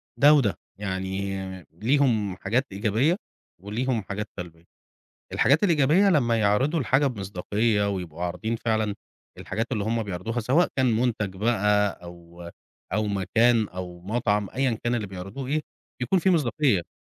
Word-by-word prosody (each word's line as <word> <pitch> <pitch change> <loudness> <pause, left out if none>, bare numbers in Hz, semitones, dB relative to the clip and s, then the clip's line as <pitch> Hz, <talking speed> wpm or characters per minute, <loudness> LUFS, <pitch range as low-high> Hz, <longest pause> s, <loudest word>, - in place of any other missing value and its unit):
ده 145 +2 +7
وده، 130 -9 +3 0.2
يعني 95 0 -3 0.4
ليهم 110 - +1
حاجات 115 +8 0
إيجابية 115 - +1 0.4
وليهم 115 +5 -2
حاجات 105 +2 -5
سلبية. 85 -2 -9 0.7
الحاجات 145 +8 +3
الإيجابية 170 +2 +4
لما 120 -9 +2
يعرضوا 130 +10 +2
الحاجة 135 +3 +2
بمصداقية، 105 0 0
ويبقوا 90 -4 -5
عارضين 110 +7 -2
فعلًا 110 -3 0 0.4
الحاجات 115 +3 -3
اللي 105 -4 -1
هم 115 +1 0
بيعرضوها، 105 +4 -3
سواء 135 +10 +3
كان 130 -2 +3
منتج 110 -5 -1
بقى 105 -1 +2 0.2
أو 85 0 -11 0.4
أو 105 +1 +1
مكان 110 +3 +2
أو 90 -1 -7
مطعم، 105 0 0
أيًا 130 -4 0
كان 120 0 +1
اللي 110 -4 -2
بيعرضوه 95 +7 -7
إيه، 155 +2 +1 0.4
بيكون 125 +10 +2
فيه 190 +2 +2
مصداقية. 135 - +2
110 Hz, 140 wpm, -25 LUFS, 95-125 Hz, 0.7 s, ده